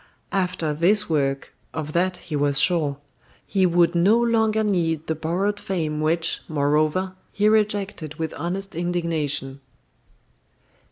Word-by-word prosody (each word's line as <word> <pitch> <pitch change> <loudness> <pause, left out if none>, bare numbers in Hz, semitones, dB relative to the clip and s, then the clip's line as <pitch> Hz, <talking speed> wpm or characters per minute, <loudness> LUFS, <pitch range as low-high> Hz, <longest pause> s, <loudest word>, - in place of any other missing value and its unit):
After 180 -5 0
this 200 +7 +3
work 135 -3 0 0.2
of 155 -1 -4
that 180 +1 +1
he 155 - -6
was 145 -1 +1
sure 150 -4 +1 0.5
he 190 -2 +2
would 170 0 +3
no 195 +7 +4
longer 220 -2 +2
need 165 -6 0
the 160 - -1
borrowed 180 +7 -1
fame 160 -7 -2
which, 165 +2 0
moreover, 155 +5 +1 0.2
he 210 0 +1
rejected 205 -7 0
with 160 0 -3
honest 195 +3 -4
indignation. 160 -6 -2
170 Hz, 125 wpm, -23 LUFS, 155-195 Hz, 0.5 s, no